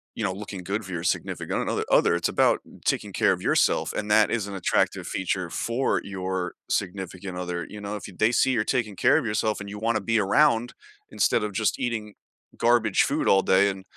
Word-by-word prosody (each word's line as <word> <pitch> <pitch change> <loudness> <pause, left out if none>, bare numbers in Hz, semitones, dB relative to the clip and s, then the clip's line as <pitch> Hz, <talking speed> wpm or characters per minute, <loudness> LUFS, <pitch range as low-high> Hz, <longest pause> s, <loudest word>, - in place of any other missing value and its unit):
you 115 - -4
know, 95 - 0
looking 100 -1 -7
good 100 +3 -3
for 95 - -9
your 85 -2 -4
significant, 90 - -2
uh - - -1
uh, - - 0
other, - - +4
it's 85 - 0
about - - +3 0.3
taking - - 0
care - - +2
of - - -6
yourself, - - +2
and 105 0 -3
that 105 -3 +5
is 110 0 -1
an 100 - -7
attractive 95 - 0
feature 90 -1 -2
for 120 +8 0
your 95 -2 -3 0.2
significant 95 -1 -3
other, 90 -2 -4
you 105 -1 -9
know? 100 +1 -4
If 105 - -7
y - - -11
they 110 +2 +4
see 130 +2 +3
you're 115 -4 +1
taking 110 -4 -1
care - - +4
of 155 - -1
yourself 105 0 0
and 100 - -7
you 105 +1 -7
wanna 115 0 +1
be 115 +3 +1
around, 120 +3 +3 0.4
instead - - +1
of 105 - -3
just 110 +2 0
eating 115 -4 -3 0.4
garbage 120 0 +3
food - - -1
all 95 - +5
day 95 +1 +4
and 95 -1 -6
100 Hz, 220 wpm, -25 LUFS, 95-110 Hz, 0.4 s, that